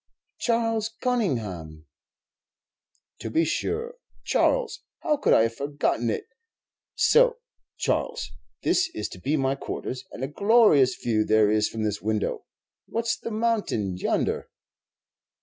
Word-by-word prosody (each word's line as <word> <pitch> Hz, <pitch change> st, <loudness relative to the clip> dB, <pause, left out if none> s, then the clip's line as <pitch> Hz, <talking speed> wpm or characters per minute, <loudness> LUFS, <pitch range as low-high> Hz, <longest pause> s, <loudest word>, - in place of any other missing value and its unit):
"Charles 225 Hz, -2 st, +1 dB
Conyngham." 105 Hz, -, -2 dB, 1.3 s
"To 110 Hz, -, -5 dB
be 160 Hz, +9 st, +2 dB
sure, 460 Hz, -, -2 dB, 0.3 s
Charles; -, -, +1 dB, 0.2 s
how 305 Hz, -3 st, +1 dB
could 285 Hz, -, +1 dB
I -, -, +6 dB
have 115 Hz, 0 st, 0 dB
forgotten 140 Hz, -3 st, -1 dB
it! -, -, -2 dB, 0.7 s
So, 480 Hz, 0 st, +4 dB, 0.4 s
Charles, 480 Hz, 0 st, -1 dB, 0.3 s
this 370 Hz, +1 st, +2 dB
is -, -, -2 dB
to -, -, -10 dB
be 150 Hz, +4 st, 0 dB
my 135 Hz, -1 st, +1 dB
quarters; 130 Hz, -1 st, -5 dB
and 130 Hz, -, -7 dB
a -, -, 0 dB
glorious 180 Hz, -, +4 dB
view 110 Hz, -3 st, 0 dB
there 110 Hz, -1 st, +4 dB
is 105 Hz, 0 st, +2 dB
from 110 Hz, -1 st, -4 dB
this 105 Hz, -1 st, -2 dB
window. 110 Hz, 0 st, -2 dB, 0.4 s
What's 230 Hz, 0 st, -1 dB
the -, -, -7 dB
mountain 215 Hz, -, 0 dB
yonder?" 90 Hz, -, -1 dB
145 Hz, 130 wpm, -26 LUFS, -, 1.3 s, I